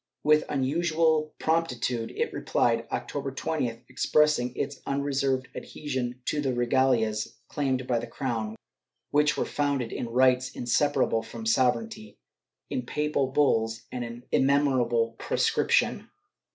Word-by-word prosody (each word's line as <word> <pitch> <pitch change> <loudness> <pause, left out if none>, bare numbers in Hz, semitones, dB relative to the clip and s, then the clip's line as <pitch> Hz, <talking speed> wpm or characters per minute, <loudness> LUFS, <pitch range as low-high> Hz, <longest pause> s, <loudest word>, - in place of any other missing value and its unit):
With 150 0 +4
unusual 155 +2 +1
promptitude 125 -8 0
it - - -1
replied, 115 -1 +1
October 140 -1 -3
20th, 135 -5 -2
expressing 130 -1 +2
its 140 0 -4
unreserved 135 -2 0
adhesion 130 -4 -4
to 150 - 0
the 135 -3 0
regalias 120 -3 +1
claimed 130 -3 -1
by 120 -2 +1
the 120 - -6
crown, 115 -3 -3 0.6
which 150 +1 +3
were - - 0
founded 140 -5 -1
in 120 - -4
rights 130 +1 +3
inseparable 120 -1 +1
from 115 0 -9
sovereignty, 215 - 0 0.5
in 255 - -3
papal 150 -2 0
bulls, 115 -5 +1
and 125 -1 -3
in 120 +1 -8
immemorial 130 -4 +2
prescription. - - +1
130 Hz, 120 wpm, -27 LUFS, 120-145 Hz, 0.6 s, With